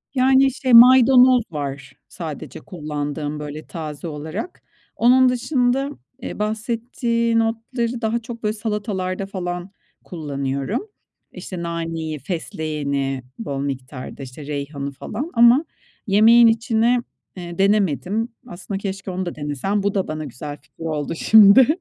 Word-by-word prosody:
Yani, 265 +1 +4
şey, 260 -1 -1
maydanoz 250 +1 +8
var 140 -3 -5
sadece 155 -5 -7
kullandığım, 150 -3 -5
böyle 150 +1 -7
taze 155 -1 -6
olarak. 160 - -6 0.3
Onun 255 +2 +5
dışında, 250 +1 0 0.3
eee, 240 - -6
bahsettiğin 230 +2 -1
otları 230 +1 -2
daha 225 +1 0
çok 235 0 -9
böyle 210 0 0
salatalarda, 205 -4 -3
falan 180 -1 -5 0.3
kullanıyorum. 140 - -3 0.4
İşte, 180 -3 -7
naneyi, 165 -2 -4
fesleğeni, 140 -4 -3 0.2
bol 140 -12 -4
miktarda, 135 0 -6
işte 135 +3 -10
reyhanı, 140 -1 -4
falan 220 - -6
ama 240 +5 +6 0.4
yemeğin 225 +4 +6
içine, 230 +1 +2 0.4
eee, 175 -1 -7
denemedim 200 - +1 0.2
aslında. 185 +3 -6
Keşke 195 -1 -5
onu 185 +1 -3
da 175 - -5
denesem, 150 +8 -2
bu 200 0 0
da 195 -2 -1
bana 155 0 -4
güzel 145 +2 -7
fikir 140 +4 -14
oldu, 155 -2 -2
şimdi. 220 +7 +7
190 Hz, 125 wpm, -21 LUFS, 150-230 Hz, 0.4 s, maydanoz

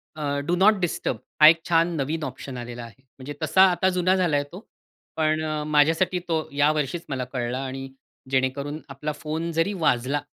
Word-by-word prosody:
A, 155 - -6 0.2
do 175 - +2
not 195 +4 +5
disturb 175 -3 -2 0.2
हा 155 - +11
एक 165 - +4
छान 170 0 +2
नवीन 155 +2 -2
ऑप्शन 130 -1 -6
आलेला 120 0 -7
आहे. 115 +2 -13 0.2
म्हणजे 135 +3 -7
तसा 190 - +3
आता 180 +2 +1
जुना 185 0 +2
झालाय 165 -6 +1
तो. 180 - -8 0.6
पण 155 0 +1 0.3
माझ्यासाठी 160 +5 +2
तो 165 -2 +1 0.2
या 145 +1 +3
वर्षीच 155 +3 -3
मला 130 -2 -2
कळला 125 0 -2
आणि 135 0 -6 0.4
जेणेकरून 135 +3 -1
आपला 140 +3 -4
फोन 160 +3 -4
जरी 165 +5 0
वाजला 145 -5 0
150 Hz, 175 wpm, -24 LUFS, 135-170 Hz, 0.6 s, हा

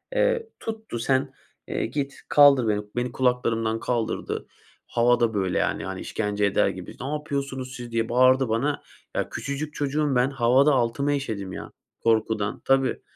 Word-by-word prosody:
Eee, - - +1
tuttu 220 - -5
sen, 130 +2 +1 0.3
eee, - - -1
git, 140 +3 -3
kaldır 140 -5 +6
beni. 105 0 +1 0.2
Beni 120 +1 0
kulaklarımdan 115 -3 +1
kaldırdı. 115 -1 -2 0.4
Hava 120 +1 +3
da, 115 -1 +2
böyle, 95 -3 0
yani, - - -1
hani, 95 0 -5
işkence 105 -1 -1
eder 100 - +3
gibi. - - -8
Napıyorsunuz 140 -2 -3
siz 120 -1 -8
diye 115 0 0
bağırdı 130 0 +4
bana. 140 +6 0 0.3
Ya - - -1
küçücük 145 +2 -4
çocuğum 145 -1 0
ben, 125 +2 +3
havada 135 +2 +4
altıma 130 +3 +1
işedim, 105 -9 -3
ya, - - -7 0.3
korkudan. 110 -2 +1
Tabii. 135 -1 +2
125 Hz, 150 wpm, -25 LUFS, 115-140 Hz, 0.4 s, kaldır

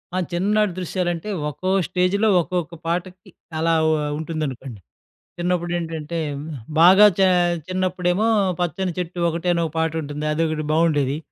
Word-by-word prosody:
ఆ! - - 0
చిన్ననాటి 205 +3 +1
దృశ్యాలంటే 175 0 -2 0.2
ఒక్కో 185 +6 -4 0.2
స్టేజ్‌లో 190 +4 +1
ఒక్కొక్క 175 -1 -3
పాటకి 180 +2 -4 0.3
అలా 165 +1 +2 0.2
ఓ - - +3 0.3
ఉంటుందనుకోండి. 140 -7 -5 0.6
చిన్నప్పుడేంటంటే, 170 -2 -2 0.2
హ్మ్, 145 +2 -7 0.3
బాగా 190 +5 +8
చే 190 - +6 0.4
చిన్నప్పుడేమో 185 +2 0 0.3
'పచ్చని 180 +1 -1
చెట్టు 175 0 -4
ఒకటే' 170 +2 -1
అనొక 170 -2 -1
పాటుంటుంది. 155 -2 -2
అదొకటి 155 -1 -1
బావుండేది. 150 -4 +2
170 Hz, 115 wpm, -22 LUFS, 160-180 Hz, 0.6 s, బాగా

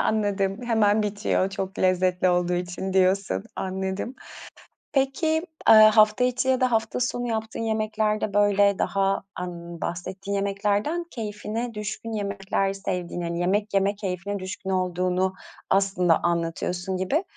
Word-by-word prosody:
Anladım. 200 -2 0
"Hemen 215 -2 +3
bitiyor 205 -2 0
çok 190 0 -5
lezzetli 185 0 +2
olduğu 180 0 +1
için." 180 +2 -3
diyorsun. 190 - +2
Anladım. 190 +5 -3 0.8
Peki, 275 +4 +1 0.4
eee, - - +10
hafta 215 +1 +6
içi 250 +1 0
ya 260 -1 +2
da 255 -1 +3
hafta 225 +1 0
sonu 245 0 -1
yaptığın 220 -1 -3
yemeklerde, 215 -2 -1
böyle, 205 -1 +3
daha, 195 - 0 0.3
aaa, 180 - -3
ımm, 170 -1 -8
bahsettiğin 190 +3 -4
yemeklerden 205 - 0
keyfine 220 +1 -4
düşkün 210 +2 -5
yemekler 195 -1 -1
sevdiğini, 180 -3 -4
hani, 170 0 -3
yemek 200 +4 0
yeme 195 +1 +2
keyfine 200 0 -4
düşkün 190 +1 -6
olduğunu 185 0 0 0.4
aslında 190 -4 +3
anlatıyorsun 175 +2 -1
gibi. 270 - 0
195 Hz, 130 wpm, -25 LUFS, 185-215 Hz, 0.8 s, eee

